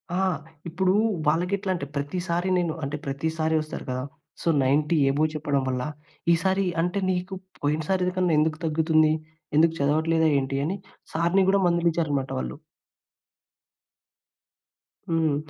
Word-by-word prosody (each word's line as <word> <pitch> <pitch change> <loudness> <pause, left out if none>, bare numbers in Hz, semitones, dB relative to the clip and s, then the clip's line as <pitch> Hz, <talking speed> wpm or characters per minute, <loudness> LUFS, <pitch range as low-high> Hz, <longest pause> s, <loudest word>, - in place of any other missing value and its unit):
ఆ! - - 0 0.5
ఇప్పుడూ 185 +3 +1 0.3
వాళ్ళకి 170 +5 +2
ఎట్లా 195 -1 -3
అంటే, 170 - -4
ప్రతిసారి 175 +5 -1
నేను 170 -3 0
అంటే, 140 +2 -2
ప్రతిసారి 160 +3 -1
వస్తారు 155 - -7
కదా! 130 0 -2 0.4
సో, - - -5 0.2
90 150 +5 +2
అబోవ్ 155 +3 +2
చెప్పడం 145 -2 0
వల్ల, 125 -1 -1 0.5
"ఈ - - +7
సారి 190 +1 +2 0.2
అంటే, 180 +3 0
నీకు 185 +1 -3 0.3
పోయినసారికన్నా, 180 +4 +1
ఎందుకు 155 +1 +1
తగ్గుతుంది? 155 0 +3 0.4
ఎందుకు 165 +1 +5
చదవట్లేదా 160 +3 +2
ఏంటి?" 135 0 -2
అని 185 +6 -2 0.4
సార్‌ని 170 +4 +3
కూడా 195 0 +3
మందలించారనమాట 165 -6 +1
వాళ్ళు. - - -5 2.5
హ్మ్. 160 -3 +2
160 Hz, 125 wpm, -25 LUFS, 150-180 Hz, 2.5 s, ఈ